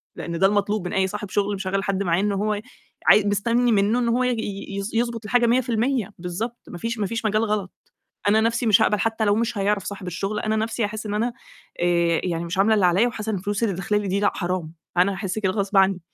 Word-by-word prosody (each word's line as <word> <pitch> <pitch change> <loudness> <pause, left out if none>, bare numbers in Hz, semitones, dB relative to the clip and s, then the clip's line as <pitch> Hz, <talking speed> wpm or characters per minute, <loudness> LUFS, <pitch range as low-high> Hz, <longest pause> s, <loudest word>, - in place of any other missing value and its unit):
لإن 170 -1 -5
ده 195 - +6
المطلوب 205 -1 0
من - - -5
أي 190 0 +2
صاحب 205 +1 -6
شغل 205 +1 0
مشغّل 195 0 -2
حد 200 -1 -1
معاه 170 -2 +1
إن 205 0 +1
هو 210 +2 0
ي 205 - -5 0.5
عا 210 - +7
مستنّي 235 +4 +2
مِنّه 210 +3 +3
إن 240 -1 +1
هو 245 +2 +2
ي - - +2
ي 200 -4 -4
ي - - -1
يضبط 230 -1 -1
الحاجة 240 +2 +3
100% 240 -1 +1
بالضبط 205 +8 -4
ما - - -7
فيش 230 +5 -3
ما 205 - +1
فيش 230 +2 -4
مجال 215 +1 +2
غلط، 210 -3 -2 0.6
أنا 215 +2 +5
نَفْسي 230 +2 0
مش 210 -3 +5
هاقبل 210 - +2
حتى 225 0 0
لو 205 -1 +3
مش 230 -1 -1
هيعرف 200 0 0
صاحب 200 -2 -6
الشغل، 195 +4 -3
أنا 215 0 0
نَفْسي 225 +1 -1
هاحس 215 +1 -4
إن 205 - -3
أنا، 230 +3 0 0.5
آآ، 170 -1 +2
يعني 170 -2 -2
مش 170 +2 -4
عاملة 215 +3 +4
اللي 200 -4 +4
عليّا 190 +7 +3
وحاسة 220 -2 -4
إن - - 0
الفلوس 205 +3 -3
اللي 205 -4 0
داخله 190 +4 0
لي 205 -1 -3
دي 195 +2 0
لأ 205 - +2
حرام، 175 -3 -3 0.2
أنا 185 +3 +4
هاحس 190 +1 -3
كده 190 -3 +1
غصب 200 0 -1
عني. 190 -1 +4
205 Hz, 245 wpm, -23 LUFS, 190-225 Hz, 0.6 s, عا